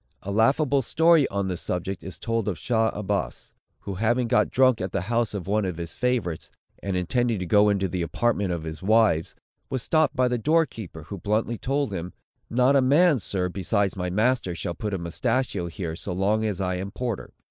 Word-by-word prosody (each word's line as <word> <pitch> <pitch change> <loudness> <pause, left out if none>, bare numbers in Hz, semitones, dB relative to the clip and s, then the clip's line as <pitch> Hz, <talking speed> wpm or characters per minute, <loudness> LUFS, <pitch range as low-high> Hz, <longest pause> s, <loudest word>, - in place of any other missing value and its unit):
A 100 - -4
laughable 135 +6 +3
story, 160 +3 +4
on 100 -1 -2
this 90 -2 -3
subject, 90 +1 -3
is 95 - -8
told 115 -2 -2
of 95 -5 -1
Shah 110 - +1
Abbas, 100 - -3 0.3
who 100 - -5
having 115 +5 +1
got - - +3
drunk 130 -3 +3
at 95 0 -4
the - - 0
house 115 +2 -1
of 95 - -4
one 105 +2 +1
of 90 -4 -3
his 85 -1 -6
favorites, 120 -10 -1 0.3
and 95 -2 -2
intending 115 +5 0
to 90 - -3
go 105 +3 +4
into 100 -1 +1
the 90 0 -3
apartment 100 +2 0
of 85 -2 -3
his 80 -1 -6
wives, 100 -5 +2 0.3
was 130 -2 -2
stopped 155 -1 +2
by 125 0 +3
the 125 -1 -1
door 160 +7 +3
keeper, 100 - -9
who 95 +5 -8
bluntly 110 +4 -1
told 140 -4 -1
him, 90 0 -5 0.4
"Not 125 +4 +3
a 135 - +5
man, 145 +3 +4
sir, 95 -3 -1
besides 95 +2 0
my 90 -1 -2
master, 110 -1 +1
shall 85 - -4
put 105 +4 -3
a - - -1
mustachio 95 +3 -1
here, 85 -1 -5
so 90 +2 -5
long 105 +4 +1
as 105 -5 -2
I 90 -1 -1
am 95 +2 -4
porter." 120 0 -4
105 Hz, 210 wpm, -25 LUFS, 90-120 Hz, 0.4 s, a